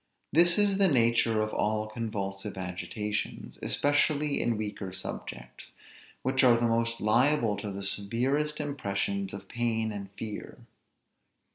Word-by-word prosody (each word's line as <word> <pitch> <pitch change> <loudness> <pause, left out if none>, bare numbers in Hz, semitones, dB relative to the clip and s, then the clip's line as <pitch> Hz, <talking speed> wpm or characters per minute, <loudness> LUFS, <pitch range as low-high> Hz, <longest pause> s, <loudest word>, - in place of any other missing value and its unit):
This 170 +2 +6
is 200 -1 +3
the 195 - +6
nature 115 -5 +3
of 110 0 -2
all 110 0 0
convulsive 105 -3 -4
agitations, 105 +3 -4
especially 145 0 +2
in 115 -2 +1
weaker 105 -3 -4
subjects, 60 -9 -7 0.5
which 130 +1 +2
are 125 -2 +7
the 120 - +1
most 115 0 0
liable 120 +1 +3
to 100 0 -4
the 100 0 -5
severest 130 +10 0
impressions 100 -9 -2
of 100 -1 -8
pain 115 -2 -1
and 100 -2 -6
fear. 110 -2 -7
110 Hz, 130 wpm, -29 LUFS, 100-130 Hz, 0.5 s, are